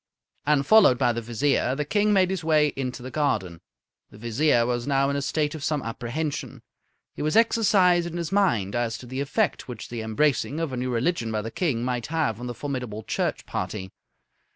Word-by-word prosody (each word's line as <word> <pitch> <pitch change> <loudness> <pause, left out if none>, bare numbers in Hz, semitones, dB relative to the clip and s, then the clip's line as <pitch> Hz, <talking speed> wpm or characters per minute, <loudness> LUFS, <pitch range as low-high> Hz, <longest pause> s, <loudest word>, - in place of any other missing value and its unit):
And, 145 -2 +3
followed 200 - +6
by 120 -1 +2
the 115 - -3
Vizier, 125 +3 0
the 150 +1 -2
King 210 +6 +2
made 190 -2 +3
his 190 -3 -3
way 155 -2 +3
into 125 -2 -4
the 130 - -7
garden. 105 - -1 0.5
The - - -15
Vizier 120 +2 +2
was 120 0 -2
now 140 0 +2
in - - -2
a 140 - -1
state 150 +1 -1
of 155 -3 -7
some 145 -1 -1
apprehension. 120 +6 -4 0.5
He - - -7
was 155 +4 0
exercised 195 -6 +4
in 170 0 -5
his 170 0 -3
mind 120 - +1
as 120 -1 -1
to - - -11
the 130 +2 -4
effect 180 +9 -1
which 120 -4 -8
the 120 -1 -4
embracing 135 +6 0
of 165 -5 -2
a - - -3
new 125 +1 -2
religion 120 0 0
by 110 -1 -2
the 115 - -5
King 135 -9 -1
might 125 -2 -2
have 150 -9 -1
on 125 - -5
the 120 - -5
formidable 125 -7 -5
Church - - -2
party. 95 -3 -4
135 Hz, 205 wpm, -25 LUFS, 120-155 Hz, 0.5 s, followed